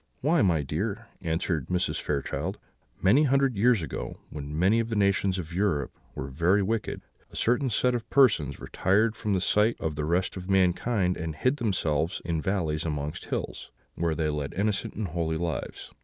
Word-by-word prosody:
"Why, 155 +3 +3
my 85 -6 +3
dear," 105 - -3
answered 80 -3 -1
Mrs. 90 0 0
Fairchild, 70 -2 -2 0.5
"many 130 +11 +5
hundred 135 -2 +2
years 110 -2 +3
ago, 75 - -5
when 75 0 -6
many 95 +7 +4
of 115 0 -1
the 115 - -2
nations 100 -2 +2
of 85 -2 -6
Europe 85 -8 0 0.2
were 65 - -4
very 85 +9 +2
wicked, 110 +2 -2 0.3
a - - -14
certain 125 +3 +2
set 125 +2 +2
of 120 -2 -3
persons 100 - +3
retired 110 +4 +1
from 105 -4 -1
the - - +2
sight 105 +4 +3
of 80 - -2
the 75 0 -3
rest 90 +3 0
of 95 0 -7
mankind, 95 +1 +2
and 80 -1 -4
hid 130 - +1
themselves 90 - 0
in 85 -2 -1
valleys 80 -4 -1
amongst 75 -2 -3
hills, - - -4 0.2
where 85 -2 -1
they 80 -1 0
led 75 -2 -3
innocent 100 +2 -1
and 105 -3 -3
holy 80 -1 -1
lives. 85 -5 -4
90 Hz, 180 wpm, -27 LUFS, 80-110 Hz, 0.5 s, many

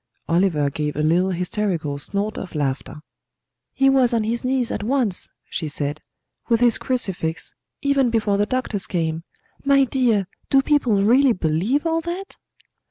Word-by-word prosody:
Oliver 165 -5 +2
gave 150 +1 -3
a 150 - -1
little 175 +4 +3
hysterical 180 -5 -2
snort 200 +8 -2
of 180 - -8
laughter. 145 +1 -3 0.7
"He 270 - +2
was 260 -3 +4
on 225 - +1
his 230 +2 -2
knees 255 -2 0
at - - -3
once," 235 -4 0 0.2
she 160 - -3
said, 145 0 -3 0.5
"with 230 -1 +3
his 240 -1 +3
crucifix, 185 -10 -2 0.3
even 280 -3 +3
before 215 -3 +1
the 205 - +2
doctors 240 -6 -1
came. 165 -2 -2 0.4
My 275 0 +5
dear, 240 -6 +1 0.2
do 270 -1 +4
people 245 -10 +2
really 250 +4 +5
believe 185 - 0
all 330 0 +1
that?" 350 +4 -6
210 Hz, 155 wpm, -22 LUFS, 165-255 Hz, 0.7 s, My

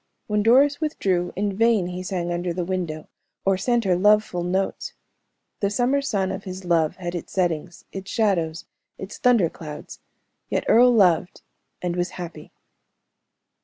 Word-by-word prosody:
When 210 0 0
Doris 275 +7 +4
withdrew, 190 - 0
in 200 0 -1
vain 225 -3 +3
he 180 +1 -5
sang 180 -2 -3
under 175 0 -2
the 180 0 -3
window, 170 -4 -3 0.4
or 195 0 +3
sent 235 +5 +1
her 185 -3 +2
love 210 +3 +5
full 180 -5 -5
notes. 190 +2 -2 0.7
The 200 - +1
summer 250 +6 +1
sun 195 -8 -1
of 190 - -5
his 185 0 -7
love 165 -3 +2
had 175 -2 -5
its 175 - -6
settings, 175 -2 -2
its 195 0 -7
shadows, 175 -7 0 0.3
its 190 +2 -8
thunder 235 -8 +4
clouds, 150 -2 -9 0.5
yet - - -1
Earle 245 +2 +6
loved 180 -6 +2 0.4
and 175 -1 -1
was 175 0 -1
happy. 165 -4 -8
185 Hz, 160 wpm, -23 LUFS, 175-210 Hz, 0.7 s, Earle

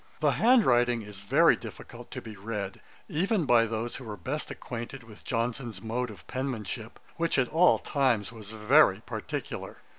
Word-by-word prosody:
The - - +3
hand 240 0 +5
writing 120 -2 +3
is 105 -1 -10
very 100 - +5
difficult - - -10
to - - -7
be 110 - -8
read, 100 -1 -5 0.3
even 190 +3 +1
by 115 -3 +5
those 115 +2 -3
who 130 - -9
were 105 -3 -6
best 135 - -4
acquainted 120 +1 -6
with 110 -2 -14
Johnson's 115 -2 -2
mode 120 +4 -2
of 105 -4 -12
penmanship, 120 -3 -4 0.2
which 165 -2 +1
at 130 -2 +2
all 170 +4 +5
times 125 -8 +1
was 110 -3 -10
very 105 -1 +4
particular. - - -5
120 Hz, 170 wpm, -29 LUFS, 110-135 Hz, 0.3 s, hand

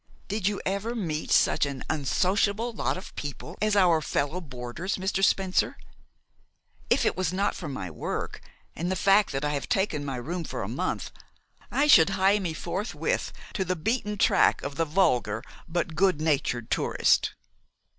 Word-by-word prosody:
Did 205 -1 -1
you 205 -1 0
ever 200 +5 -1
meet 160 -8 -3
such - - +4
an 140 -2 -5
unsociable 200 - +1
lot 215 - -1
of 185 - -9
people 145 +4 -6
as 215 -1 +2
our 175 -5 +4
fellow 150 +4 -1
boarders, 135 +5 -4
Mr. 190 +1 -1
Spencer? 190 -2 +2 1.1
If - - +3
it - - +2
was 185 -3 0
not 195 +2 0
for 175 - -6
my 95 - -5
work, - - -4 0.3
and 175 +3 -2
the - - 0
fact 200 +2 +4
that 135 +1 -2
I 145 - 0
have 140 -4 -3
taken 190 -7 0
my 135 -2 -3
room 165 +8 -4
for - - -4
a - - -4
month, - - -3 0.6
I 285 - +2
should 165 - +7
hie 195 +2 +4
me 175 -5 -3
forthwith 195 +7 -2 0.2
to 195 - 0
the 185 0 -1
beaten 210 +4 -1
track - - +3
of 140 0 -4
the 165 - +1
vulgar 125 - +1 0.2
but 170 -1 -2
good 180 -1 +2
natured 140 -7 0
tourist." - - +2
180 Hz, 170 wpm, -27 LUFS, 145-195 Hz, 1.1 s, should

